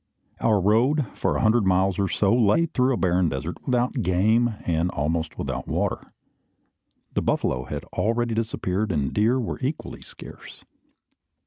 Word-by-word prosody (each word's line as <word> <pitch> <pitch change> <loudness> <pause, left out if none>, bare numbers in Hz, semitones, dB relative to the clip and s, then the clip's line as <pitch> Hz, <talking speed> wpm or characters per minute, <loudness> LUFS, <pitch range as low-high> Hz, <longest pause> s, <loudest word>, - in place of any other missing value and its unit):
Our 110 -3 +2
road, 120 - +2
for - - -1
a - - -1
hundred 110 +1 +4
miles 95 0 +2
or 100 - +1
so, 100 +2 +1
lay 120 +6 +3
through 130 -5 +1
a 125 - 0
barren 90 -2 +2
desert, 75 +6 -5
without 125 0 0
game, 110 +5 +2
and 85 +1 0
almost 80 +2 -2
without - - -4
water. - - -2 1.0
The - - 0
buffalo 65 -1 -1
had - - -5
already 115 +1 0
disappeared, 110 -3 -2
and 75 -5 -1
deer 115 +5 +2
were 115 - -4
equally 140 +4 -4
scarce. - - -13
105 Hz, 150 wpm, -24 LUFS, 90-120 Hz, 1.0 s, hundred